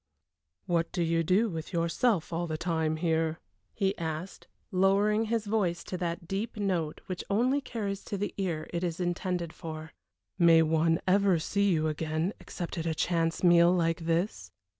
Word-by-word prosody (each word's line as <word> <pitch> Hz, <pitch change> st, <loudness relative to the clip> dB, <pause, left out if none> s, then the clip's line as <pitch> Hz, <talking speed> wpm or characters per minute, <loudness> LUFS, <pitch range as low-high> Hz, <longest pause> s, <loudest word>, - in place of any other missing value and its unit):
"What 170 Hz, -1 st, 0 dB
do 175 Hz, -, 0 dB
you 165 Hz, 0 st, +1 dB
do 185 Hz, +8 st, +3 dB
with 165 Hz, -3 st, -6 dB
yourself 170 Hz, +3 st, +1 dB
all 170 Hz, +1 st, -1 dB
the 155 Hz, -1 st, -3 dB
time 160 Hz, -2 st, 0 dB
here?" 160 Hz, -1 st, 0 dB, 0.3 s
he 195 Hz, 0 st, 0 dB
asked, 160 Hz, +3 st, -5 dB, 0.2 s
lowering 200 Hz, +4 st, +3 dB
his 225 Hz, -1 st, -1 dB
voice 195 Hz, -5 st, 0 dB
to 185 Hz, -, -5 dB
that 170 Hz, -1 st, -3 dB
deep 215 Hz, +5 st, -3 dB
note 180 Hz, -7 st, -1 dB
which 185 Hz, -2 st, -5 dB
only 250 Hz, +8 st, +2 dB
carries 205 Hz, -6 st, -4 dB
to 200 Hz, -, -3 dB
the 205 Hz, +2 st, -3 dB
ear 170 Hz, -6 st, -2 dB
it 170 Hz, +1 st, -1 dB
is 170 Hz, -1 st, -2 dB
intended 175 Hz, -1 st, -2 dB
for. 160 Hz, 0 st, -8 dB, 0.5 s
"May 165 Hz, -1 st, +7 dB
one 160 Hz, +1 st, +2 dB
ever 195 Hz, -1 st, +4 dB
see 200 Hz, +5 st, +1 dB
you 160 Hz, -2 st, +1 dB
again 155 Hz, +4 st, -1 dB
except 175 Hz, -1 st, -6 dB
at 165 Hz, -, -2 dB
a 160 Hz, -, 0 dB
chance 165 Hz, +1 st, 0 dB
meal 175 Hz, -1 st, +6 dB
like 165 Hz, -2 st, 0 dB
this?" 165 Hz, -, -1 dB
170 Hz, 170 wpm, -29 LUFS, 165-195 Hz, 0.5 s, May